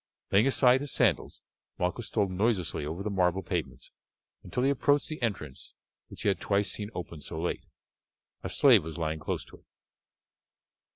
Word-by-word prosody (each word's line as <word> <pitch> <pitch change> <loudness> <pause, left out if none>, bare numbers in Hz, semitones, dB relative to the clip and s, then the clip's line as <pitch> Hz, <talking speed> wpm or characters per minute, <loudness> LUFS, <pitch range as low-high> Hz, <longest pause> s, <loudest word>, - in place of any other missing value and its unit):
Laying 105 +6 +5
aside 130 -1 +4
his 145 -2 -5
sandals, - - +1 0.3
Malchus 90 +6 -1
stole 105 -3 +1
noiselessly 95 -5 0
over 85 +5 -4
the 105 - -2
marble 95 0 +1
pavements 85 -4 -4 0.5
until 125 - -3
he 135 - +4
approached 145 +1 +2
the 155 -2 -6
entrance 90 - -4 0.3
which - - -8
he - - 0
had 95 -3 +2
twice 100 -1 +1
seen 105 -1 -4
opened 85 -3 -7
so 80 - -6
late. 85 - -3 0.8
A - - -3
slave 120 - +6
was 80 0 -7
lying 80 -1 -2
close - - -3
to - - -15
it. - - -29
100 Hz, 170 wpm, -29 LUFS, 85-120 Hz, 0.8 s, slave